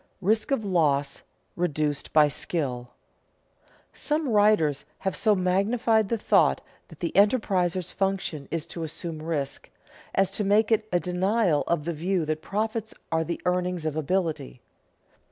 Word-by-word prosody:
[Sidenote: - - -40
Risk 220 0 +2
of 230 -6 0
loss 145 -7 +1 0.3
reduced 150 -4 -1
by 150 -1 +6
skill] 140 -4 -2 1.0
Some 300 -1 -1
writers 205 - +3
have 190 - -2
so 215 -2 +3
magnified 200 +4 +1
the 230 - 0
thought - - +3 0.3
that - - -16
the 170 - -1
enterpriser's 190 -4 +2
function 190 -7 -2
is 165 -2 -3
to 170 - -8
assume 160 0 -5
risk, 155 -4 -4 0.5
as 195 0 +2
to 210 - -2
make 210 +3 +3
it 215 -1 +1
a 175 - +3
denial 180 -2 +1
of 170 -3 0
the 170 - -2
view 175 +2 -1
that 155 0 -2
profits 220 +3 -3 0.2
are 160 0 +1
the 170 +1 -4
earnings 180 -2 0
of 155 -1 -1
ability. 155 - -2
180 Hz, 150 wpm, -26 LUFS, 155-205 Hz, 1.0 s, by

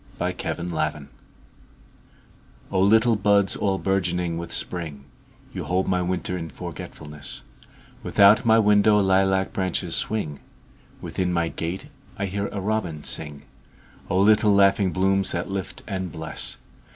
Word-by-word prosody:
A - - 0
Song 85 - -4
in - - -4
Spring 75 -3 -2 1.6
O 95 - +1
LITTLE 110 +3 +4
buds 100 -1 +3
all 100 -2 0
bourgeoning 90 -3 0
with 85 - -7
Spring, 80 -6 -4 0.5
You - - -5
hold 95 +1 0
my 90 -1 +1
winter 90 0 -2
in 80 -1 -6
forgetfulness; 75 -3 -8 0.6
Without 100 +4 +5
my 110 -2 +5
window 105 -1 +5
lilac 95 0 +2
branches 90 -2 -1
swing, 80 -10 -2 0.6
Within 90 -1 -2
my 85 -1 0
gate 90 - -5 0.3
I 100 - -1
hear 100 +1 -2
a 100 - -5
robin 95 -7 -2
sing—O 75 +4 -6
little 105 0 +5
laughing 100 -1 +4
blooms 95 +1 +1
that 85 +3 -3
lift 95 -1 -5
and 95 -3 -3
bless! 80 0 -5
95 Hz, 135 wpm, -24 LUFS, 85-100 Hz, 1.6 s, Without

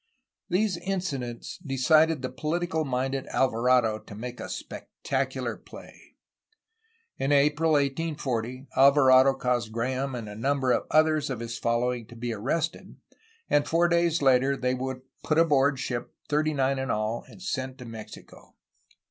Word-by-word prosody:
These 185 0 +1
incidents 170 -10 -4
decided 155 +2 +3
the 130 - -3
political 160 +4 -1
minded 135 0 -2
Alvarado 120 -3 +2
to 105 - -12
make 120 +3 -7
a - - -6
spectacular - - -4
play. - - -15 1.0
In 135 +2 0
April 150 +3 +3
1840 135 -4 -1
Alvarado 135 -1 +6
caused 125 -3 -1
Graham 130 +3 -2
and 115 -3 -6
a 105 - -7
number 130 +3 0
of - - 0
others 155 -1 +3
of 130 -4 -3
his 115 0 -5
following 120 0 -1
to 120 - -13
be 120 0 -3
arrested, 150 - -3 0.5
and 145 0 +2
four 170 +1 +3
days 170 -2 +2
later 135 +1 +4
they 125 0 0
were 130 0 -4 0.2
put 155 - 0
aboard 140 -4 +3
ship, 125 -2 -4 0.2
thirty 155 +1 +1
nine 135 0 +1
in 135 - -3
all, 110 +2 -1
and - - -15
sent 130 -8 -3
to 125 - -10
Mexico. 115 -2 -11
135 Hz, 145 wpm, -27 LUFS, 125-155 Hz, 1.0 s, Alvarado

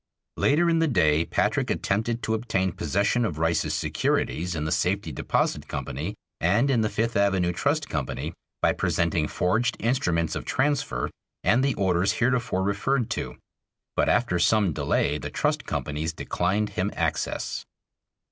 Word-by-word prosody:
Later 155 +5 +3
in 165 -1 +3
the 165 - +3
day 80 - +3
Patrick - - 0
attempted 110 +4 -1
to 110 - 0
obtain 100 -5 0
possession 100 - 0
of 85 -9 -2
Rice's 80 +1 +1
securities 90 +2 -1
in 75 - -2
the 75 - -2
Safety 90 0 0
Deposit 65 - -1
Company 80 +11 -4 0.2
and 105 +11 +3
in 120 -4 +3
the 110 - +1
Fifth 115 +3 -1
Avenue 95 -3 +2
Trust 145 - 0
Company, 70 -4 -3 0.3
by - - +4
presenting 85 -2 0
forged 110 +10 0
instruments 85 -9 0
of - - -3
transfer 145 +1 0 0.3
and 125 +4 +3
the 140 - +1
orders 95 -1 +2
heretofore 115 -6 +1
referred 115 +5 0
to; - - -3 0.6
but - - +2
after 90 -8 +2
some 95 +1 +3
delay 75 +1 0
the - - -5
trust - - -1
companies 75 +2 -2
declined 100 +6 -1
him 95 +3 -1
access. - - -2
100 Hz, 150 wpm, -26 LUFS, 85-120 Hz, 0.6 s, by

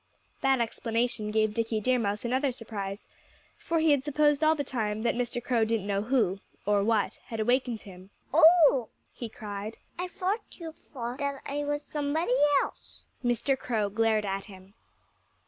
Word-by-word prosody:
That 270 -1 +3
explanation 230 -1 -1
gave 215 0 +1
Dickie 225 0 -1
Deer 255 +3 +2
Mouse 205 0 -2
another 260 +3 +1
surprise; 210 -4 -6 0.5
for 335 - -2
he 320 -1 +4
had 280 -2 +3
supposed 295 0 +2
all 310 +1 +5
the 290 - -2
time 220 -5 -2
that 235 - +1
Mr. 240 0 -2
Crow 240 -3 +2
didn't 220 -2 0
know 200 -1 0
who 215 -5 +1 0.3
or 205 -1 +3
what 220 -1 +1
had 225 - -6
awakened 245 0 +1
him. 185 -1 -13 0.2
"Oh!" 315 -6 +6 0.2
he 235 - -6
cried. 210 0 -6 0.2
"I 360 - -1
thought 380 +4 -1
that - - -16
you 330 -2 -6 0.2
thought 250 0 -5 0.2
I 290 +1 -2
was 290 0 -2
somebody 295 0 -1 0.3
else." - - -10 0.2
Mr. 245 +3 +1
Crow 220 -6 -1
glared 220 0 +2
at 195 0 -3
him. 190 -1 -14
235 Hz, 165 wpm, -28 LUFS, 210-280 Hz, 0.5 s, Oh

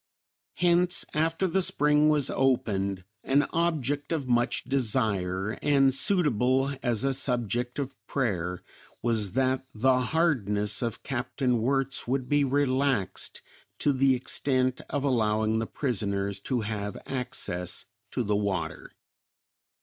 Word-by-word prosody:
Hence, 175 +1 +2
after 165 +4 +1
the 190 +2 +1
spring 150 -2 +3
was 150 -3 +3
opened 100 -8 0 0.2
an 140 +2 +3
object 150 -4 -1
of 150 -5 -1
much 120 0 +1
desire, 110 -6 0
and 135 -2 +4
suitable 135 - +2
as 120 -2 0
a 135 - +2
subject 125 -1 0
of 140 -1 -3
prayer, 90 -9 -2 0.4
was 110 -5 +1
that 130 0 +1
the 130 +3 +3
hardness 110 - +1
of 115 -2 -3
Capt. 130 +1 -4
Wirtz 130 +2 0
would 130 0 -1
be 145 +1 +3
relaxed 135 -5 0 0.3
to 145 - +2
the 135 0 +3
extent 130 0 0
of 145 -2 -2
allowing 110 -4 +1
the 110 - -2
prisoners 100 -6 -2
to 125 -3 -2
have 105 -2 -4
access 90 -9 -3 0.2
to 125 - -2
the 105 -1 0
water. 95 -6 -3
130 Hz, 125 wpm, -27 LUFS, 110-140 Hz, 0.4 s, and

